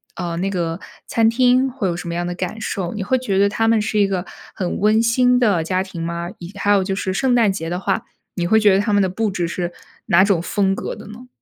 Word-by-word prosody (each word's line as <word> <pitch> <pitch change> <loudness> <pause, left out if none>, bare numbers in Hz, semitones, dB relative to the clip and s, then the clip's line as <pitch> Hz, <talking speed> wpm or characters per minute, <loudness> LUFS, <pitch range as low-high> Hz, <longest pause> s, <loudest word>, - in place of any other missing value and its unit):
呃， 170 -2 -4
那 185 - -1
个 170 -2 -2 0.3
餐 225 -1 +2
厅 255 +2 +3
会 205 -6 -2
有 170 - -2
什 175 - -7
么 170 - -3
样 175 +1 -2
的 175 - -4
感 185 +5 -4
受， 185 -3 -3
你 210 - -4
会 260 +7 +1
觉 200 -7 -1
得 200 0 +4
他 225 +2 0
们 225 -1 +3
是 215 0 -2
一 200 - +4
个 185 -2 -2 0.3
很 185 -3 -3
温 215 +2 +3
馨 250 +2 +3
的 200 -9 +2
家 185 +3 0
庭 190 -3 -6
吗？ 170 +1 -4
以 175 +1 -9
还 205 0 -2
有 200 -2 +4
就 195 +1 -2
是 190 -1 -2
圣 255 +6 +1
诞 230 -4 +4
节 165 -4 -4
的 180 - -2
话， 195 0 -1 0.3
你 175 - -1
会 220 +5 +4
觉 205 -3 +5
得 - - +3
他 205 +1 0
们 205 - +4
的 190 - +1
布 210 +2 -1
置 175 -3 -2
是 175 0 -4 0.3
哪 190 -2 +5
种 200 -4 +2
风 195 +2 0
格 - - -5
的 - - -12
呢？ 230 +4 -11
195 Hz, 290 characters per minute, -20 LUFS, 175-220 Hz, 0.3 s, 觉